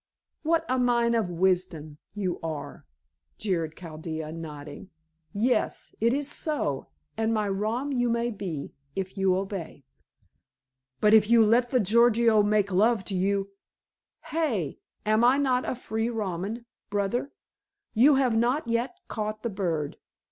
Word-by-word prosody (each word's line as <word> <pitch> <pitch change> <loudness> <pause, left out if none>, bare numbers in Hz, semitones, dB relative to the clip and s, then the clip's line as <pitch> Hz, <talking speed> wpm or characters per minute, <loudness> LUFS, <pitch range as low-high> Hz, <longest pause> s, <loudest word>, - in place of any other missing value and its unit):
"What 330 +1 +1
a 255 +1 +1
mine 240 -1 +3
of 225 -6 +1
wisdom 175 -4 0 0.2
you 190 -4 -2
are," 160 -3 -6 0.5
jeered 165 -6 -2
Chaldea, 160 -2 -6
nodding. 155 +1 -8 0.4
"Yes. 220 +2 0
It 230 +1 +4
is 280 +2 -1
so, 290 - -2 0.3
and 225 0 +1
my 215 -2 +1
rom 215 +8 -1
you 245 -2 +1
may 235 +1 0
be, 180 -9 -5 0.2
if 190 -1 -4
you 190 -2 +2
obey." 190 -7 -5 1.2
"But 210 0 +5
if 215 -1 +6
you 230 -1 +6
let 240 +3 +3
the 255 - +2
Gorgio 230 +1 +4
make 205 -1 +2
love 215 +2 +3
to 195 - -3
you 195 +1 0 0.4
" - - -65
"Hey! 240 - -1 0.3
Am 215 +2 +3
I 250 +3 +5
not 260 -3 +1
a - - -2
free 225 -1 -2
Roman, 210 +1 -3 0.2
brother? 205 +7 -1 0.6
You 270 +6 +6
have 260 -4 +2
not 240 +5 +1
yet 235 +9 -1
caught 215 0 -4
the 235 - -2
bird. 170 -7 -2
215 Hz, 145 wpm, -27 LUFS, 185-235 Hz, 1.2 s, if